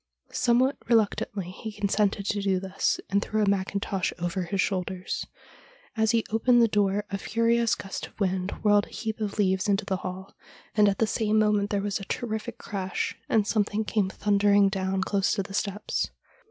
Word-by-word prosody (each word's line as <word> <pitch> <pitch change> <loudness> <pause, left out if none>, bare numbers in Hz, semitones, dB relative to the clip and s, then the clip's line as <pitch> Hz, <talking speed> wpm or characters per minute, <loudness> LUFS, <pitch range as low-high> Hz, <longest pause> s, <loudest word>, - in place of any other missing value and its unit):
Some 240 -1 +2
what 260 +3 +2
reluctantly 205 -4 +1
he 220 +4 -7
consented 205 -1 0
to 205 0 0
do 195 -2 +1
this, 190 +1 -1
and 200 +1 +3
threw 215 0 0
a - - +1
mac 195 -1 +1
kintosh 200 -1 -1
over, 175 +1 -2
his 190 +3 -3
shoulders. 185 -1 -2 0.7
As 220 -1 +2
he 230 0 +2
opened 240 +2 +4
the 230 - +6
door 205 -1 +1
a 195 - -2
furious 230 +2 +2
gust 195 - -6
of - - -24
wind 190 -1 0
whirled 205 -1 +4
a - - -17
heap 220 -1 -4
of 210 -1 -3
leaves 190 0 +1
into 200 +2 +1
the 190 - -1
hall, 185 +1 -7 0.4
and 210 -1 +5
at 195 - -1
the 225 - +3
same 215 0 +1
moment 210 -1 +2
there 200 -1 0
was 205 -1 -1
a 195 - -7
terrific 220 +1 -4
crash, 190 -2 -3
and 215 -2 +3
something 215 0 0
came 205 -3 +1
thundering 200 0 +3
down 190 0 -1
close 195 0 +1
to 195 - -1
the 195 - -10
steps. 205 0 -1
205 Hz, 195 wpm, -27 LUFS, 195-215 Hz, 0.7 s, the